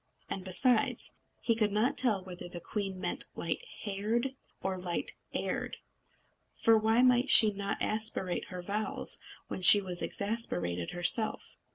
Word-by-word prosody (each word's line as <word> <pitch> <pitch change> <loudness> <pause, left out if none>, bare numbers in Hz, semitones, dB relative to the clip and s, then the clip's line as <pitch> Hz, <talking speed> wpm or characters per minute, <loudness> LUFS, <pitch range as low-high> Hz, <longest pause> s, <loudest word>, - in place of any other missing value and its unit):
And 190 - -4
besides, 220 +6 +2 0.3
he 230 - +2
could 215 -2 +1
not 215 +5 +1
tell 225 -7 +1
whether 180 -1 -9
the 175 - -8
queen 195 +1 -5
meant - - 0
light - - -3 0.2
haired 220 +6 -2 0.3
or 190 0 -2
light 180 -2 -1 0.2
heired; - - -4 0.8
for 225 - +3
why 220 +3 +2
might 250 +1 +3
she 215 -3 +7
not 200 0 -4
aspirate 215 -4 -2
her 180 -1 -8
vowels 210 +3 0 0.3
when - - -6
she 205 +3 +9
was 180 -3 -3
exasperated 90 - -3
herself? 175 +6 0
205 Hz, 145 wpm, -30 LUFS, 185-225 Hz, 0.8 s, she